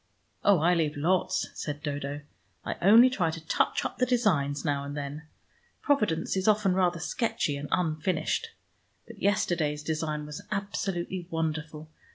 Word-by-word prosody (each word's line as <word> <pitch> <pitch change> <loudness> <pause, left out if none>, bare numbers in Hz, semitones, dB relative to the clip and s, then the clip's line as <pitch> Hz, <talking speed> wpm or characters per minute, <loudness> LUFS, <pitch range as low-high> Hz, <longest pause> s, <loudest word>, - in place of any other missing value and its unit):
"Oh, 200 -2 +6
I 170 +3 +3
leave 155 -3 0
lots," 175 +5 +1
said 145 0 -5
Dodo. 145 -1 -3 0.4
"I - - -2
only 225 +7 +8
try 190 -10 0
to 160 0 -7
touch - - +1
up - - -4
the 250 - +3
designs 160 - +1
now 140 -2 0
and 140 +1 -6
then. 145 +2 -6 0.6
Providence 210 - +1
is 190 +1 -1
often 210 -3 +4
rather 180 -2 +1
sketchy 160 -4 -1
and 145 +1 -6
unfinished. 175 - 0 0.6
But - - -13
yesterday's 165 -7 +1
design 155 -1 -2
was 150 0 -7
absolutely 190 -3 -3
wonderful. 155 -1 -3
160 Hz, 150 wpm, -28 LUFS, 150-190 Hz, 0.6 s, only